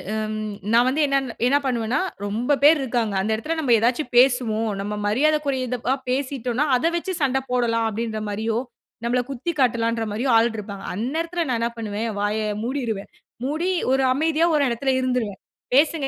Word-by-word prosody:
ம். 215 0 -3 0.2
நான் 240 +2 +5
வந்து 295 +4 0
என்ன 275 0 +2 0.3
என்ன 280 +3 +4
பண்ணுவேன்னா 240 +2 0 0.2
ரொம்ப 240 +8 0
பேர் 305 +1 +7
இருக்காங்க. 235 -5 -1
அந்த 215 +3 -1
இடத்துல 315 +9 -3
நம்ம 255 -6 +3
எதாச்சு 245 +7 +1
பேசுவோம். 245 -4 +3
நம்ம 205 +1 -4
மரியாதக்குறைந்தபா 260 -1 +1 0.2
பேசிட்டோன்னா 260 0 -1
அத 330 +7 +1
வச்சு 375 +2 -3
சண்ட 265 -1 +2
போடலாம் 230 -2 +1
அப்படின்ற 220 0 -3
மாரியோ, 220 +2 -1 0.5
நம்மள 245 +1 +2
குத்தி 275 +6 -3
காட்டலான்ற 230 -2 +1
மாரியோ 250 +4 0
ஆள் 230 +1 +3
இருப்பாங்க. 200 -1 -7
அந்த 235 +8 -3
எடத்துல 335 -1 -2
நான் 235 - 0
என்ன 235 0 0
பண்ணுவேன். 220 0 -3
வாய 205 +1 0 0.3
மூடிருவேன். 235 -6 -3 0.3
மூடி 320 +7 -1 0.2
ஒரு 265 0 +2
அமைதியா 320 +3 +2
ஒரு 290 - +3
இடத்துல 260 +3 0
இருந்துருவேன். 250 -6 -2 0.3
பேசுங்க. 295 0 +3
245 Hz, 160 wpm, -23 LUFS, 225-275 Hz, 0.5 s, பேர்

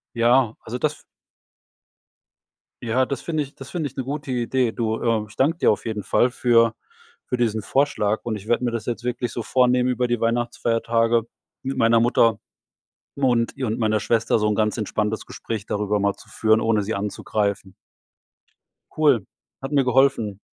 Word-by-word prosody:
Ja, 120 0 +3
also 120 +3 -5
das 150 +2 0
f - - -20 1.8
Ja, 125 +3 +1
das 140 -3 -4
finde 155 -3 -1
ich 140 - -11
das 135 0 -10
finde 160 -5 -2
ich 135 - -20
'ne 130 - -3
gute 145 0 -5
Idee. 125 0 0
Du, 110 -1 -2
äh, 115 -2 +1
ich 105 - -16
danke 160 +5 +1
dir - - +4
auf - - -4
jeden 110 -3 -4
Fall 125 - +2
für 115 -2 +3 0.5
für 125 - -1
diesen 110 -3 0
Vorschlag. 110 -4 0
Und 110 -2 -3
ich 100 +1 -10
werde 120 +1 +1
mir 120 - +1
das 115 -1 -4
jetzt 120 -1 -3
wirklich 120 0 -2
so 120 - -4
vornehmen 125 0 +2
über 125 0 0
die 120 -1 -1
Weihnachtsfeiertage 115 0 +1 0.4
mit 135 +1 -3
meiner 115 0 +4
Mutter 115 -2 +3 0.8
und 125 -4 +1
ihr 130 -2 -2
und 110 - -2
meiner 110 -2 +1
Schwester 115 +2 +1
so 105 - +1
'n 105 - +1
ganz 105 0 0
entspanntes 110 0 -2
Gespräch 110 -3 -6
darüber 105 0 -1
mal 100 0 +1
zu - - -18
führen, 110 0 +2
ohne 110 -2 +1
sie 110 +3 -3
anzugreifen. 100 -1 -2 1.2
Cool. 145 -7 +3 0.4
Hat 135 +2 -5
mir 140 -2 +3
geholfen. 125 -6 +2
115 Hz, 180 wpm, -23 LUFS, 110-125 Hz, 1.8 s, dir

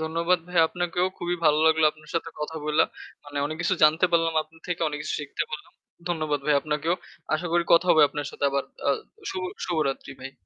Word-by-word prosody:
ধন্যবাদ 165 +3 +1
ভাইয়া 175 -2 +4
আপনাকেও। 175 0 -1
খুবই 175 0 -1
ভালো 150 0 +5
লাগলো 160 0 +4
আপনার 155 -1 -17
সাথে 165 0 -1
কথা 160 +2 -4
বলে। 150 0 +3 0.4
মানে 145 0 -10
অনেক 155 +1 -5
কিছু 185 - +2
জানতে 155 +4 +6
পারলাম 165 -1 +2
আপনার 160 +1 -22
থেকে, 175 -1 -2
অনেক 150 0 -5
কিছু - - -3
শিখতে 145 - -3
পারলাম। 150 - -7 0.4
ধন্যবাদ 155 -4 -1
ভাই 150 - +4
আপনাকেও। 155 +3 0 0.4
আশা 170 +3 -2
করি 175 0 +3
কথা 170 +2 +6
হবে 155 - +7
আপনার 145 -1 -4
সাথে - - -4
আবার। 140 0 0 0.2
আ - - +6 0.4
শুভ 185 - -4 0.2
শুভরাত্রি 140 -5 -1
ভাই। 135 +1 -7
160 Hz, 200 wpm, -26 LUFS, 150-170 Hz, 0.4 s, হবে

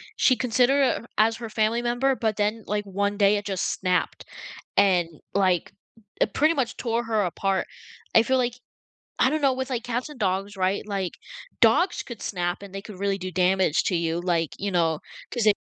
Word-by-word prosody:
she 255 - +4
considered, 255 +3 +3 0.2
uh - - -15
as 225 +1 +4
her 230 -1 -7
family 220 +2 +1
member, 245 +3 +1
but 220 -3 -1
then, 210 +1 0
like, 210 0 -1
one 200 +1 -1
day 200 0 +4
it 205 - -5
just 190 -3 -1
snapped 180 -1 -1 0.6
and, 180 -4 +4 0.3
like, 185 -3 +1 0.5
it - - +2
pretty 315 +3 +3
much 265 -5 -1
tore 235 0 -1
her 220 -2 +1
apart. 190 +1 -1 0.5
I 225 - +7
feel 260 +1 +2
like 245 -1 0 0.7
I 260 - +5
don't 310 +1 -1
know 270 -2 +4
with, 260 +1 -4
like, 245 -2 -2
cats 245 +4 -3
and 295 - -11
dogs, 195 +1 -1
right, 190 +2 0
like, 195 -3 -2 0.5
dogs 350 0 +4
could 235 -4 -9
snap 175 0 -2
and 195 -1 -11
they 195 - -5
could 200 -3 -11
really 200 0 0
do 185 0 -5
damage 185 -3 +2
to 180 - +1
you, 165 0 0
like, 170 -3 0
you 200 0 -3
know, 165 -3 +1 0.3
'cause 240 -3 -1
they 210 -1 +6
205 Hz, 200 wpm, -25 LUFS, 185-240 Hz, 0.7 s, I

